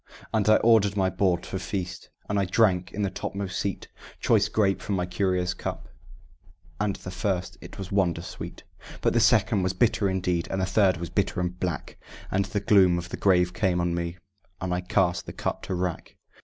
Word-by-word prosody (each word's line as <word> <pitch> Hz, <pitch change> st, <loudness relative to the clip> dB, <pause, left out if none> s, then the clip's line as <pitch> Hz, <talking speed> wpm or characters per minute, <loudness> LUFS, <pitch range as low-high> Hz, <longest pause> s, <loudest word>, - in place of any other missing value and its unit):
And 110 Hz, -1 st, +2 dB
I 110 Hz, -, +8 dB
ordered 110 Hz, -3 st, +4 dB
my 95 Hz, -1 st, +2 dB
board 90 Hz, -1 st, +1 dB
for 95 Hz, -, -4 dB
feast; 90 Hz, -1 st, -5 dB, 0.2 s
and 100 Hz, -1 st, 0 dB
I 100 Hz, -, +2 dB
drank, 90 Hz, -2 st, +2 dB
in 105 Hz, -, -2 dB
the 100 Hz, -, -1 dB
topmost 100 Hz, -1 st, -4 dB
seat, 100 Hz, -2 st, -3 dB, 0.3 s
Choice 110 Hz, -2 st, +3 dB
grape 100 Hz, -3 st, +1 dB
from 100 Hz, -3 st, -1 dB
a 90 Hz, -, 0 dB
curious 90 Hz, 0 st, 0 dB
cup; -, -, -6 dB, 0.9 s
and 100 Hz, -1 st, 0 dB
the 95 Hz, -, -8 dB
first 90 Hz, -1 st, -2 dB
it -, -, -11 dB
was 95 Hz, -1 st, -7 dB
wonder 90 Hz, -4 st, +1 dB
sweet; -, -, -8 dB, 0.4 s
But -, -, +2 dB
the -, -, +3 dB
second 95 Hz, -, +4 dB
was 90 Hz, 0 st, 0 dB
bitter 110 Hz, -4 st, +2 dB
indeed, 90 Hz, -2 st, -1 dB
and 95 Hz, -, -2 dB
the 95 Hz, -, +1 dB
third 95 Hz, -1 st, +3 dB
was 85 Hz, -1 st, -6 dB
bitter -, -, 0 dB
and 90 Hz, 0 st, -2 dB
black, 90 Hz, -3 st, -4 dB, 0.3 s
And 95 Hz, +1 st, +1 dB
the 100 Hz, +1 st, -2 dB
gloom 95 Hz, -3 st, +5 dB
of 85 Hz, 0 st, -5 dB
the -, -, -4 dB
grave 90 Hz, -2 st, +3 dB
came 90 Hz, +1 st, +1 dB
on 85 Hz, 0 st, 0 dB
me, 85 Hz, 0 st, -3 dB, 0.4 s
and 90 Hz, -1 st, -2 dB
I 90 Hz, -, -1 dB
cast 90 Hz, -1 st, +1 dB
the -, -, -6 dB
cup -, -, -3 dB
to 95 Hz, -, -2 dB
wrack. 90 Hz, -2 st, -3 dB
95 Hz, 205 wpm, -26 LUFS, 90-100 Hz, 0.9 s, I